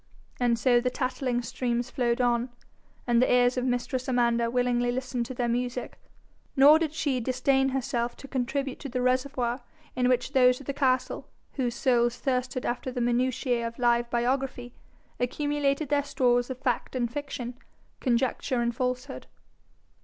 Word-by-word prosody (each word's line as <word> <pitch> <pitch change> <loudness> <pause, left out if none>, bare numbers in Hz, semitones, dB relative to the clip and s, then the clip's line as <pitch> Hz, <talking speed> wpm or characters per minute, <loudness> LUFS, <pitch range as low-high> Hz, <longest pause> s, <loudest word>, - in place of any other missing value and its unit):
And 240 -2 +2
so 245 0 +4
the 250 - +1
tattling 255 -1 -2
streams 240 0 -2
flowed 240 -3 0
on, 245 0 +1 0.6
and 240 -1 +3
the 255 - +3
ears 245 0 +4
of 250 0 -1
mistress 250 +1 -1
Amanda 235 -2 +2
willingly 245 0 +1
listened 250 -1 -3
to 260 - -7
their 240 0 0
music, 245 +1 -3 0.6
nor 290 +3 +8
did 320 -3 -1
she 290 -4 -1
disdain 265 +2 +1
herself 255 -2 -2
to 275 - -10
contribute 270 +1 -2
to 280 - -6
the 250 0 -2
reservoir 255 -1 0 0.3
in 250 0 +2
which 250 +2 +1
those 250 -2 +5
of 280 - -12
the 280 - -2
castle 260 -2 0 0.3
whose 245 -4 -1
souls 240 -1 +2
thirsted 250 0 -1
after 250 +1 -2
the 250 - -4
minutiae 245 0 0
of 230 - -8
live 240 -1 +2
biography, 245 0 -1 0.5
accumulated 290 +2 0
their 290 0 +3
stores 245 -3 +1
of 260 - -4
fact 255 0 -2
and 240 -2 -1
fiction, 270 -4 -4 0.5
conjecture 250 0 0
and 235 0 0
falsehood. 250 +2 -3
250 Hz, 160 wpm, -27 LUFS, 240-265 Hz, 0.6 s, nor